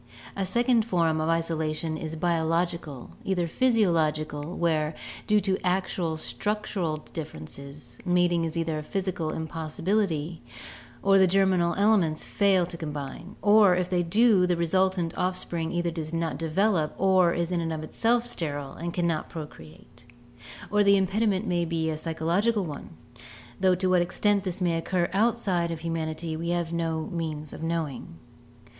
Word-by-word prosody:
A 195 -1 -1
second 240 +2 +3
form 165 -7 +1
of 160 - 0
isolation 160 -1 -1
is 155 0 -5
biological, 165 -3 -1
either 180 -3 0
physio 225 -1 +3
logical, 155 0 -1
where, 155 -2 0 0.3
due 210 0 +4
to 190 -1 -1
actual 180 -3 0
structural 195 -3 -2
differences, 140 - -9
mating 175 -2 +2
is 165 0 -3
either 165 -2 -1
a - - -4
physical 180 -1 -2
impossibility 160 +1 -2 0.6
or 195 0 +5
the 190 - +6
germinal 185 -2 +2
elements 200 -7 +2
fail 195 -3 +3
to 170 - -7
combine, 150 +3 -6
or 205 -3 +6
if 180 0 -1
they 180 -1 +1
do 195 +1 +4
the 175 -1 +1
resultant 180 0 +1
offspring 175 -3 -1
either 175 -1 -1
does 160 -1 -5
not 165 -1 -2
de 165 -1 -3
velop 180 -2 +1
or 185 -2 +4
is 170 +1 -1
in 175 -1 0
itself 225 +10 0
sterile 145 - -3
and 170 +1 -5
cannot 170 -3 0
procreate; 120 - -11 0.7
or 210 0 +4
the 200 0 +5
impediment 195 +1 +1
may 175 -3 0
be 160 -1 -1
a - - -2
psychological 175 +7 0
one, 150 -3 -7 0.7
though 185 -1 +4
to 185 +1 0
what 180 -1 +4
extent 200 +3 +1
this 185 0 -3
may 170 -2 +2
occur 175 +1 0
outside 200 -5 +1
of 165 -1 -5
humanity 160 0 -3
we 170 +2 -3
have 170 -1 -1
no 165 -1 -1
means 155 -3 -4
of - - -8
knowing. 160 - -3
170 Hz, 150 wpm, -27 LUFS, 160-190 Hz, 0.7 s, the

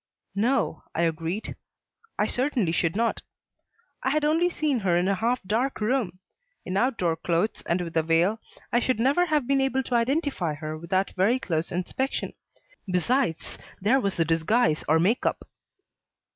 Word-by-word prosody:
"No," 215 - +1
I 170 - +1
agreed, 165 +5 -2 0.6
"I 210 - +2
certainly 245 - 0
should 165 0 0
not. 230 +2 0 0.8
I - - 0
had 300 +2 +1
only 325 +4 +3
seen 300 -6 0
her 180 -4 +2
in 180 +1 +1
a 200 - +3
half 230 +5 0
dark 230 +8 -1
room. 215 -5 0 0.5
In 185 - -3
outdoor 195 -7 +1
clothes 170 +5 -1
and 175 +1 +1
with 165 -1 -6
a 160 - +4
veil, 165 +7 +2 0.3
I 240 - +5
should 250 -1 0
never 285 +9 +3
have 300 -4 +1
been 275 +1 +2
able 265 0 +1
to 250 - -5
identify 240 - 0
her 155 +1 -5
without 180 +4 -1
very 200 +7 +2
close 165 -8 -2
inspection. 185 +10 -2 0.6
Besides 180 0 0 0.2
there 225 +8 +3
was 200 -6 -1
the 165 - +2
disguise 165 +2 +2
or 160 - +4
make 205 +9 +2
up." - - -1
210 Hz, 165 wpm, -26 LUFS, 170-260 Hz, 0.8 s, I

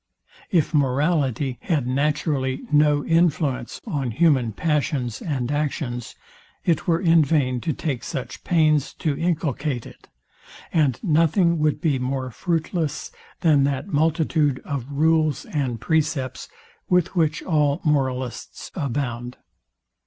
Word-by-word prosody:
If 165 -4 +1
morality 140 -2 +1
had 155 -9 0
naturally 135 0 0
no 150 -1 +3
influence 155 -7 +1
on 135 -5 -2
human 130 -2 +2
passions 140 -3 -1
and 135 -5 -2
actions, 140 -5 -3 0.5
it 170 +2 +1
were 165 -1 +3
in 165 -3 +5
vain 130 -4 +1
to 165 - -1
take 140 -4 -3
such 135 -5 -6
pains 155 -4 +2
to 150 -3 -1
inculcate 150 -6 -1
it; - - -15 0.6
and 145 -7 +2
nothing 170 0 +3
would 150 -1 +1
be 150 -6 +1
more 130 0 -2
fruitless 160 - -2 0.3
than 155 -5 +4
that 140 +5 -2
multitude 155 -2 +2
of 140 -2 -4
rules 155 0 +2
and 130 -6 -2
precepts, 150 -3 -1 0.4
with 180 0 +2
which 155 -3 +1
all 150 -3 +1
moralists 130 -5 -2
abound. 125 -5 -3
150 Hz, 120 wpm, -23 LUFS, 130-160 Hz, 0.6 s, in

